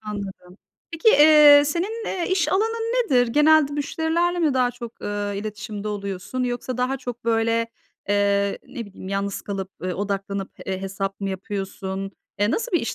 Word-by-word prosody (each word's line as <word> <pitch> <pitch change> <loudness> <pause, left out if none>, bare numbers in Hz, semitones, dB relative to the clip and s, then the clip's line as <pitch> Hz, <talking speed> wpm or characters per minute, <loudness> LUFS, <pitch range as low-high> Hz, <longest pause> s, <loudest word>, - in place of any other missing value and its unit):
Anladım. 200 -3 -7 0.3
Peki, 330 +7 +2
eee, 300 -4 +8
senin, 395 +10 -2
eee, 355 -3 -2
iş 375 -1 +2
alanın 450 +3 0
nedir? 245 - +3
Genelde 300 +2 +4
müşterilerle 320 +4 0
mi 310 -6 +2
daha 250 -1 +2
çok, 235 -2 -9
eee, 205 0 -3
iletişimde 215 0 -5
oluyorsun? 200 +4 -4
Yoksa 245 0 -3
daha 255 +2 0
çok 245 -2 -7
böyle, 230 0 +1 0.4
eee, 200 0 +2
ne 230 -3 -6
bileyim, 195 -1 -10
yalnız 200 0 -2
kalıp, 195 -1 -5
ııı, 185 0 -2
odaklanıp, 200 -1 -3 0.2
eee, 190 0 -3
hesap 195 +1 -4
mı 195 - -2
yapıyorsun? 195 0 -5 0.3
Eee, 205 +1 +2
nasıl 460 - -2
bir 345 - +3
iş 230 - -3
225 Hz, 160 wpm, -23 LUFS, 200-295 Hz, 0.4 s, eee